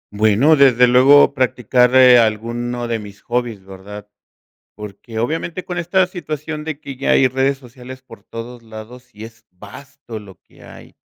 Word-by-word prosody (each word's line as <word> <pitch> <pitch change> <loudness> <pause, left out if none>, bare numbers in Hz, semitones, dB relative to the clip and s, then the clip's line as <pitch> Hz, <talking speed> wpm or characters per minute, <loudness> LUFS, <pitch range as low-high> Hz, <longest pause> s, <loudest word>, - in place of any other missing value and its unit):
Bueno, 110 +9 +3
desde 125 -3 +4
luego 135 +4 +5
practicar, 125 -1 +1
eh, 125 -1 +7
alguno 120 +2 -2
de 115 -1 -2
mis 100 -1 -13
hobbies, 120 -5 -4
¿verdad?, 100 +2 -11 0.7
porque, 105 +2 -9
obviamente, 160 +8 -4
con 180 - -6
esta 180 +2 +1
situación 155 -4 -7
de 155 -2 -6
que 140 -3 -9
ya 135 - -4
hay 130 - +4
redes 135 +2 -1
sociales 130 0 -13
por 120 -3 -16
todos 115 +1 -10
lados, 110 +3 -12
sí 110 -3 -12
es 115 0 -16
vasto 110 +6 -12
lo 100 -3 -15
que - - -22
hay, - - -15
125 Hz, 160 wpm, -18 LUFS, 110-135 Hz, 0.7 s, eh